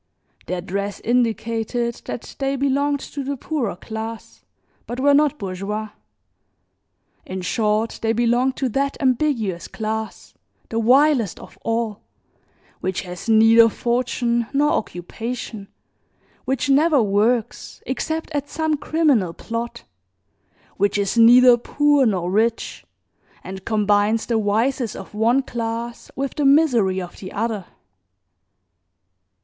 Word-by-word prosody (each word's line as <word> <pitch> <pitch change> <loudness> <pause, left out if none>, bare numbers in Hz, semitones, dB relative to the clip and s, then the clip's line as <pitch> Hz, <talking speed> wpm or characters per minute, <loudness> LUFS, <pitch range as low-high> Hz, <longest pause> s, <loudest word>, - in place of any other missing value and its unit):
Their 180 +1 -2
dress 200 +3 -4
indicated 235 0 0
that - - -7
they 275 0 0
belonged 280 +1 0
to 280 - -6
the 280 +1 -3
poorer 255 - -2
class 220 +3 -7 0.4
but 245 - -5
were 285 +2 +4
not 295 +1 +3
bourgeois; 200 +2 -4 1.3
in 185 0 -6
short 215 +4 0
they 225 - +1
belonged 240 +3 +1
to 265 - -1
that 275 +4 -1
ambiguous 250 - 0
class, 220 0 -5 0.4
the 230 0 -1
vilest 255 - +3
of - - -13
all, 225 -2 -2 0.8
which 185 0 -2
has 180 +4 -7
neither 225 +1 +6
fortune 240 0 -1
nor 295 +2 +3
occupation, 220 - -4 0.8
which 270 +2 -1
never 290 +2 +4
works 215 +2 0
except 315 +6 -3
at 290 -1 -3
some 315 -2 -1
criminal 280 - +1
plot, 230 +5 -5 0.9
which 200 +1 +1
is 200 +1 0
neither 240 +2 +7
poor 290 +2 +2
nor 180 -4 -1
rich 225 +3 0 0.6
and 190 0 -8
combines 210 0 +2
the 230 -2 0
vices 225 +3 0
of 195 - -10
one 235 +5 +2
class 235 -1 -5
with 275 0 -3
the 295 - -1
misery 250 -10 +4
of 180 -1 -8
the 185 - -8
other. 210 -3 -3
230 Hz, 120 wpm, -21 LUFS, 210-270 Hz, 1.3 s, neither